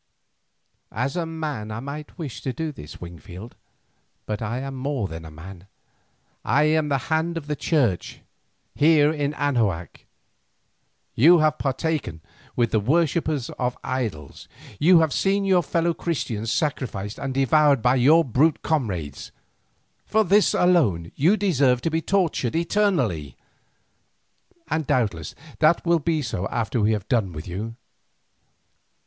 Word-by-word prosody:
"As 125 - -2
a 170 -2 -2
man 150 -9 -5
I 110 +1 -5
might 145 +5 -8
wish 150 -8 -6
to 130 - -2
do 160 +3 -4
this, 75 - -11
Wingfield, 90 +5 -10 0.7
but 105 0 -4
I 115 +2 -3
am 135 +1 -5
more 130 -4 -2
than 80 -1 -8
a - - -8
man, 90 +4 -12 0.8
I 150 - +2
am 155 0 +2
the 140 - +2 0.2
hand 165 +2 0
of 160 - -6
the 150 0 -2
Church 130 - 0 0.5
here 150 0 +4
in 145 -1 -2
Anahuac. 110 -13 -1 1.1
You 165 +9 +6
have 155 0 +1
partaken 140 - -2 0.4
with 120 -2 +1
the 110 - +2
worshippers 150 +2 0
of 125 -1 -1
idols, 110 - -4 0.3
you 170 +2 +6
have 160 -4 +1
seen 195 +1 +1
your 185 -2 +4
fellow 170 +1 0
Christians 115 -10 -3
sacrificed 125 - -2
and 135 - -3
devoured 135 -1 +3
by 125 - +4
your 150 +6 +5
brute 140 +5 +2
comrades. 95 - -2 0.8
For 220 0 +3
this 205 +2 +3
alone 120 - +2
you 175 +10 +3
deserve 140 - +2
to 165 - -1
be 160 +1 0
tortured 165 - 0
eternally, 165 - 0 1.3
and 155 -3 -2
doubtless 105 - -1 0.2
that 160 +3 +3
will 170 -1 +3
be 155 0 -1
so 100 -6 -3
after 115 0 -2
we 105 +1 +3
have 105 -3 -4
done 105 -8 0
with 75 +2 -8
you. 105 +6 -5
135 Hz, 140 wpm, -23 LUFS, 110-160 Hz, 1.3 s, You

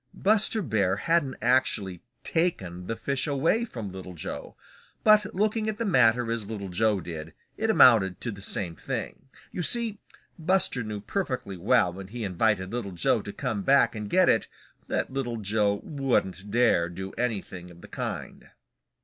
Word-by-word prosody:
Buster 215 +1 +2
Bear 100 - +1
hadn't 145 +3 +1
actually 110 -8 +1 0.2
taken 95 - -1
the 115 - -2
fish 135 +4 -1
away 160 - +1
from 115 - -7
Little 95 -1 -9
Joe. 80 - -7 0.5
But 215 -2 +4
looking 215 +2 +1
at 215 - -3
the 230 - -2
matter 125 - +3
as 115 -3 -2
Little 100 -3 -5
Joe 105 +2 +1
did, 80 -2 -7 0.2
it 220 +1 -1
amounted 110 - +6
to 120 - -2
the 100 -1 -10
same 90 -3 -1
thing. 135 - -5 0.2
You - - -4
see, 225 +3 +2 0.4
Buster 170 -6 +1
knew 105 -2 -5
perfectly 130 - -3
well 90 -1 +2
when 95 +1 -8
he 115 +3 -6
invited 95 0 0
Little 110 -6 -4
Joe 90 +5 +1
to 100 - -7
come 115 -3 -3
back 135 +5 +4
and 105 -2 -5
get 185 - +4
it 110 - +3 0.4
that - - -2
Little 120 -4 -2
Joe 105 -1 0
wouldn't 105 - -1
dare 110 -7 +3
do 95 +2 -6
anything 100 -7 -4
of 85 0 -15
the - - -11
kind. - - -6
115 Hz, 165 wpm, -27 LUFS, 95-140 Hz, 0.5 s, amounted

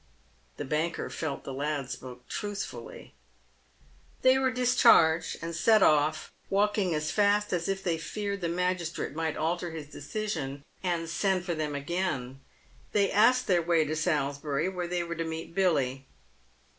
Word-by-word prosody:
The - - -4
banker 155 +4 -2
felt 145 -4 -4
the 135 - -6
lad 140 -1 -2
spoke 125 -1 -9
truthfully. 205 - -6 1.1
They 260 +1 +6
were 265 -1 +2
discharged, 245 -10 +4
and 165 0 -4
set 215 +5 +5
off 155 +1 +2 0.2
walking 200 -3 +2
as 155 +1 -1
fast 205 0 +2
as 170 -1 -1
if 195 0 -2
they 165 -2 0
feared 200 +3 -4
the 170 - -1
magistrate 175 -3 -2
might 160 0 -2
alter 170 +3 -1
his 160 -2 -7
decision 145 -5 -4 0.2
and 170 -3 -1
send, 185 +2 0
for 175 - -1
them 155 -2 -2
again. 140 -4 -3 0.5
They 200 -2 +3
asked 245 +5 +4
their 180 -3 +3
way 165 -1 +2
to 155 +1 -2
Salisbury, 145 -1 0
where 180 -2 -4
they 175 0 -1
were 170 0 -4
to 165 0 -3
meet 160 0 -6
Billy. 135 -8 +1
170 Hz, 155 wpm, -29 LUFS, 155-195 Hz, 1.1 s, They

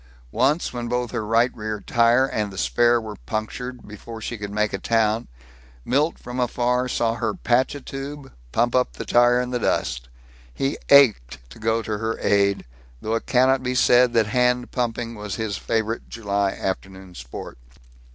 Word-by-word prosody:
Once, 145 - +1
when 120 -1 -4
both 125 0 -2
her 120 -3 -2
right 115 +3 +2
rear 110 -1 -4
tire 120 +4 +3
and 105 -6 -2
the 95 - -10
spare 120 +4 +3
were 110 -2 -8
punctured 120 +3 -5
before 110 +2 -9
she 115 +2 -5
could 105 -2 -6
make 105 +1 -1
a - - -2
town, 110 0 +1 0.6
Milt 145 +6 +1
from 125 +1 -7
afar 125 +1 +1
saw 115 -2 0
her 110 -2 -2
patch 125 +4 +1
a 145 - -7
tube, 135 +1 -7 0.2
pump 120 +1 +1
up 125 0 +1
the - - -7
tire 120 0 +4
in 125 0 -2
the 125 - -1
dust. - - -1 0.4
He 135 - -2
ached 100 - +4
to - - -13
go 110 +1 0
to 105 -1 -3
her 115 +1 -2
aid 100 -1 +1 0.3
though 110 - -3
it 115 - -2
cannot 130 +1 +3
be 125 0 -2
said 125 0 +5
that 115 -2 +3
hand 125 +3 +1
pumping 120 -1 -2
was 105 -3 -5
his 110 -2 -3
favorite 115 +1 -2
July 100 -3 -1
afternoon 95 -1 -5
sport. - - -9
115 Hz, 180 wpm, -23 LUFS, 105-125 Hz, 0.6 s, said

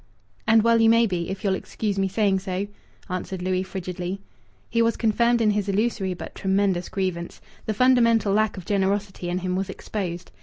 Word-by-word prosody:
"And 220 -1 +5
well 230 0 +4
you 225 - +6
may 230 +1 +5
be, 180 -4 -2
if 195 0 -5
you'll 195 -2 +2
excuse 200 +1 -3
me 195 - +2
saying 195 -1 +1
so!" 190 0 -3 0.4
answered 185 -1 -4
Louis 185 0 0
frigidly. 185 0 -5 0.5
He 230 - +1
was 230 0 +2
confirmed 235 +1 +2
in 215 -2 +4
his 205 -1 -1
illusory 200 -2 0
but 170 - -8
tremendous 190 -2 0
grievance. 185 -3 -3 0.3
The 215 - -1
fundamental 230 -4 +4
lack 215 0 +1
of 185 - -8
generosity 195 -2 -1
in 175 - -1
him 185 0 -2
was 190 +1 -2
exposed. 185 -3 -5
195 Hz, 185 wpm, -24 LUFS, 185-220 Hz, 0.5 s, you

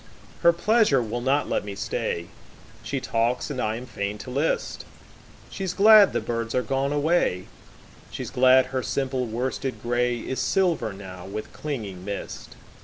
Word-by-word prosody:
Her 170 - +7
pleasure 205 - +3
will 120 0 -3
not 135 +3 +1
let - - -1
me 100 -1 -6
stay. 85 -3 -3 0.5
She - - -3
talks 120 +5 -1
and 130 -3 -3
I 110 +1 0
am 120 +2 -7
fain 100 -4 -4
to 125 - -8
list:She's 165 +5 -4
glad 210 0 +8
the - - 0
birds 115 -1 -3
are 125 - +2
gone 135 +1 -1
away, 145 - +1 0.6
She's - - -6
glad 130 +1 +5
her 130 - 0
simple 130 -1 -1
worsted 130 +3 -3
grayIs 120 +1 -1
silver 165 - +1
now 95 -2 -9
with 105 +2 -6
clinging 105 -12 -5
mist. 100 0 -6
125 Hz, 150 wpm, -25 LUFS, 110-145 Hz, 0.6 s, glad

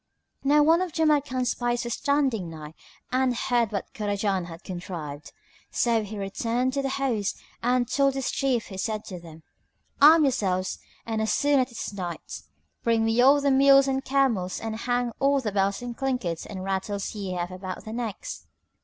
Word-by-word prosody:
Now 295 +2 +5
one 325 +3 +4
of 370 -2 -2
Jamrkan's 285 -5 +2
spies 240 0 -1
was 235 -1 -3
standing 270 - 0
nigh 155 -1 -9 0.4
and 255 -1 +2
heard 235 -2 +1
what 200 -2 -4
Kurajan 200 -3 -1
had 165 -1 -10
contrived; 170 -6 -7 0.4
so 230 -2 +2
he 210 +1 -7
returned 230 +6 -1
to 280 - 0
the 270 - -1
host 250 -7 -1 0.2
and 245 0 +2
told 275 +1 +2
his 270 -2 -1
chief 260 -4 0
who 190 -2 -7
said 215 +1 -2
to 180 -2 -7
them, 165 -1 -13 0.6
"Arm 310 +2 +8
yourselves 190 -9 0 0.3
and 225 -1 -2
as 220 - +1
soon 285 -1 +3
as 255 - +2
it - - -18
is 210 - -5
Night, 170 - -6 0.4
bring 230 -1 +2
me 225 +2 +3
all 280 +3 +6
the 280 0 +2
mules 275 0 +6
and 270 0 0
camels 250 -10 +1
and 225 -1 -4
hang 245 +1 -1
all 280 0 +3
the 225 -5 -2
bells 200 +3 0
and 240 -1 -5
clinkets 250 -12 -2
and 190 -2 -6
rattles 195 +1 -2
ye 200 -3 -4
have 175 0 -3
about 185 0 -7
their 220 - -6
necks." 230 -4 -5
230 Hz, 185 wpm, -26 LUFS, 195-270 Hz, 0.6 s, Arm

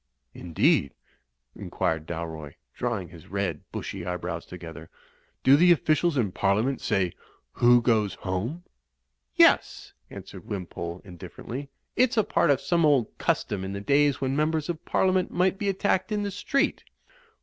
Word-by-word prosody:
'" 65 - -50
"Indeed," 80 -4 +2 0.6
inquired 80 -1 -2
Dalroy, 80 -3 -6 0.2
drawing 110 -8 -3
his 85 -2 -14
red 95 -6 -2
bushy 95 -3 -5
eyebrows 90 -1 -4
together. 80 -2 -10 0.5
"Do 135 - +7
the 175 +4 +6
officials 160 -1 +2
in 110 -7 +1
Parliament 105 +8 0
say, 90 -3 0 0.4
Who 120 0 +4
goes 110 -5 +2
home?'" 105 - -4 0.7
"Yes," - - +3 0.2
answered - - -10
Wimpole, 90 -3 -5
indifferently, 120 +9 -8 0.3
"it's 245 -1 +2
a 220 - +5
part 170 - +1
of 140 -3 +4
some 170 -1 +1
old 140 -7 +2
custom 95 -2 -1
in 95 +1 -4
the 100 - -4
days 140 +5 +2
when 135 0 -1
Members 155 +1 0
of 165 -2 -4
Parliament 185 -1 +1
might 185 +2 +1
be 200 - 0
attacked 190 0 0
in 210 -1 0
the 200 - -3
street." 275 +8 0
120 Hz, 150 wpm, -26 LUFS, -, 0.7 s, Do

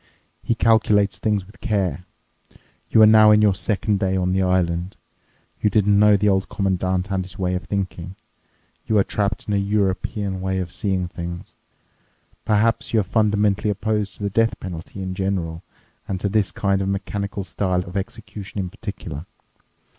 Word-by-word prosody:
He 115 - 0
calculates 110 -3 +3
things 105 -3 0
with 100 - -19
care. 95 - -1 0.8
You 110 - +6
are - - +10
now 110 0 +7
in 105 0 +6
your 105 -2 +4
second 105 +1 -1
day 95 0 0
on 90 0 0
the 95 - +2
island. 90 -1 0 0.6
You 105 - +3
didn't 100 -1 +3
know 105 -1 +6
the 105 +1 +1
Old 95 -1 +1
Commandant 95 -1 -1
and 95 -1 0
his 90 0 -12
way 90 -2 -1
of 90 -3 -3
thinking. 95 -1 -4 0.7
You 110 - +2
are 100 - +5
trapped 100 0 -2
in 105 - -1
a - - +2
European 100 0 -1
way 95 0 -1
of 90 -2 -3
seeing 95 -3 -1
things. 85 0 -7 0.9
Perhaps 110 +2 +1
you - - +5
are - - +2
fundamentally 105 -1 +1
opposed 105 0 -1
to - - -9
the 100 - -1
death 115 +2 +1
penalty 90 +2 -7
in 95 0 -4
general 90 -4 -2 0.5
and 95 -1 -3
to 100 - -1
this 105 -2 +1
kind 100 -1 0
of 95 - -1
mechanical 100 +1 -3
style 90 -2 -1
of 90 - -10
execution 105 -1 -6
in 90 -2 -3
particular. 95 -7 -7
100 Hz, 175 wpm, -22 LUFS, 95-105 Hz, 0.9 s, are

